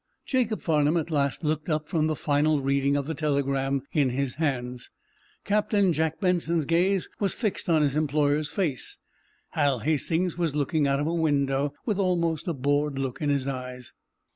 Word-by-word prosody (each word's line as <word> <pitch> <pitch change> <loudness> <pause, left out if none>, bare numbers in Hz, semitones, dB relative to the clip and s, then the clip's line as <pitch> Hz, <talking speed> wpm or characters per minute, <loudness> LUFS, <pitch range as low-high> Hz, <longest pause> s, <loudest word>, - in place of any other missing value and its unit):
Jacob 250 -7 0
Farnum 155 0 +2
at 165 0 -2
last 140 +1 0
looked 155 +1 -1
up 155 -1 -1
from 155 -3 +1
the 155 - 0
final 150 0 +2
reading 140 +1 +1
of 140 -1 0
the 160 - -3
telegram 140 -2 0
in 145 -6 +2
his 130 0 -2
hands. 125 -5 -2 0.6
Captain 205 -2 +2
Jack 160 +1 -1
Benson's 170 -4 +1
gaze 180 +4 +2
was 200 -3 0
fixed 210 -5 -2
on 160 -2 +4
his 140 -1 +1
employer's 150 0 +1
face. 160 -10 -2 0.5
Hal 140 -5 +1
Hastings 165 +5 0
was 165 -4 0
looking 150 0 +1
out 140 0 +1
of 145 - 0
a 165 - -1
window, 140 -3 +1
with 210 -4 -1
almost 170 -4 0
a 170 - 0
bored 145 +1 0
look 135 0 -3
in 150 - 0
his 140 -2 0
eyes. 125 -2 -6
150 Hz, 175 wpm, -26 LUFS, 140-165 Hz, 0.6 s, on